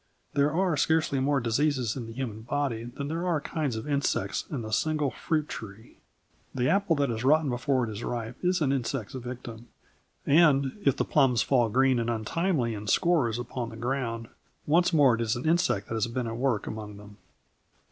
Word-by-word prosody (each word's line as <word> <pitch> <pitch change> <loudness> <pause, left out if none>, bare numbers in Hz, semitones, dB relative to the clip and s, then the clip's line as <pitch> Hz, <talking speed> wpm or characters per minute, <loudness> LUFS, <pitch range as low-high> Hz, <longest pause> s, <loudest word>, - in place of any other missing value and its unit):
There 145 +1 +2
are 180 0 +1
scarcely 155 -2 +2
more 140 +1 +2
diseases 125 0 0
in 120 -4 -5
the - - -8
human 115 -4 -5
body 120 -1 -2
than 135 +4 -6
there 165 +4 -2
are 170 -4 +1
kinds 145 -4 -2
of 110 +5 -5
insects 140 -2 -1
in 125 -7 -4
a 110 - -5
single 155 -1 +1
fruit 155 +5 -1
tree. 110 +1 -9 0.6
The 125 -1 +1
apple 195 -1 +2
that 140 -3 +1
is 110 0 -3
rotten 150 +1 +3
before 125 +1 0
it 115 - -3
is 105 +2 -6
ripe 115 -1 -4
is 180 0 +1
an 140 -3 +2
insect's 130 -4 -2
victim, 120 -2 -7 0.6
and, 140 -3 +4
if 140 - +3
the - - 0
plums 125 -4 +3
fall 120 -4 +2
green 130 +2 +3
and 115 0 -1
untimely 120 - 0
in 105 0 -7
scores 145 - +2
upon 120 0 -4
the 115 - -10
ground, 115 -2 -3 0.4
once 170 +5 +3
more 145 -7 +5
it 115 - -1
is 110 -1 0
an 120 - -5
insect 165 - +1
that - - -3
has 110 0 0
been 120 +1 -3
at 115 0 -4
work 120 -4 0
among 105 -1 -7
them. 105 0 -13
130 Hz, 200 wpm, -28 LUFS, 115-145 Hz, 0.6 s, more